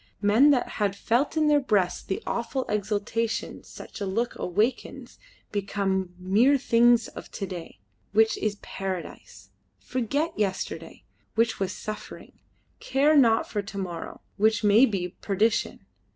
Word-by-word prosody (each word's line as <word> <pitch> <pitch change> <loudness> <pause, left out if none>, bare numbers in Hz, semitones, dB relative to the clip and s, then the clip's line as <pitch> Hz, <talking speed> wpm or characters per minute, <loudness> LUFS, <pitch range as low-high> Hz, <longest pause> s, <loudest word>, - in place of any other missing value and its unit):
Men 220 +8 +5
that 265 -4 +3
had 200 -1 +1
felt 255 +9 0
in 310 -1 +3
their 295 -1 +5
breasts 200 -9 +1
the 190 - -4
awful 235 +3 -2
exultation 210 +2 -2
such - - -11
a 200 - -1
look 230 +6 -1
awakens 210 +8 -2 0.3
become 195 -2 -2
mere 210 +10 +3
things 240 -2 +4
of - - -11
to 200 - -3
day 170 - -9 0.3
which 220 +2 +4
is 215 -1 -1
paradise; 190 -2 -7 0.3
forget 280 +7 -2
yesterday 195 -3 -3 0.3
which 230 0 +1
was 195 -1 -1
suffering; 215 0 -8 0.4
care 280 +4 +2
not 230 -6 +4
for 205 - -2
to 200 0 -9
morrow 175 -4 -6 0.2
which 220 +2 +2
may 215 +6 +6
be 185 -4 -2
perdition. 205 - 0
215 Hz, 135 wpm, -26 LUFS, 195-240 Hz, 0.4 s, may